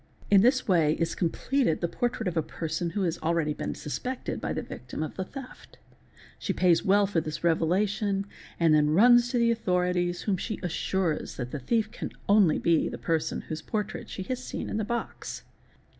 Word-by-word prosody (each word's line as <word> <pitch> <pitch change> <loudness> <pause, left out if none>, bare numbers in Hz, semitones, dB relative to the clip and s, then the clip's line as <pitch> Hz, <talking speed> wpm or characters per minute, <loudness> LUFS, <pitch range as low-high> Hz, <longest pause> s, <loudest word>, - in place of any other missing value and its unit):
In 200 -1 +7
this 255 +3 +3
way 165 -6 +4
is 165 +1 -1
completed 210 - 0
the 170 - 0
portrait 240 +3 -2
of 180 - -2
a 160 - +3
person 165 +2 -3
who 195 +4 -2
has 170 -2 -1
already 160 -2 0
been - - -4
suspected 250 - -4
by - - -2
the - - -2
victim - - -6
of 155 - -5
the 190 - -2
theft. 270 +6 -11 0.6
She - - -1
pays 175 -3 +3
well 200 +1 +4
for 190 -4 0
this 155 0 -6
revelation 195 +4 +1 0.3
and 165 -2 +4
then 150 -1 +4
runs 240 +4 +6
to 245 - 0
the 235 0 +4
authorities, 180 -4 0
whom 200 -3 0
she 220 +3 -4
assures 175 -1 -1
that 125 -1 -5
the 150 - -4
thief 215 - 0
can - - -5
be - - -14
only 200 -6 +5
the 170 -2 +1
person 165 -2 -1
whose 155 0 -6
portrait 215 -1 -4
she 190 - -5
has 255 +5 -4
seen - - -5
in - - -1
the 220 - 0
box. 235 +3 -4
180 Hz, 195 wpm, -28 LUFS, 165-215 Hz, 0.6 s, In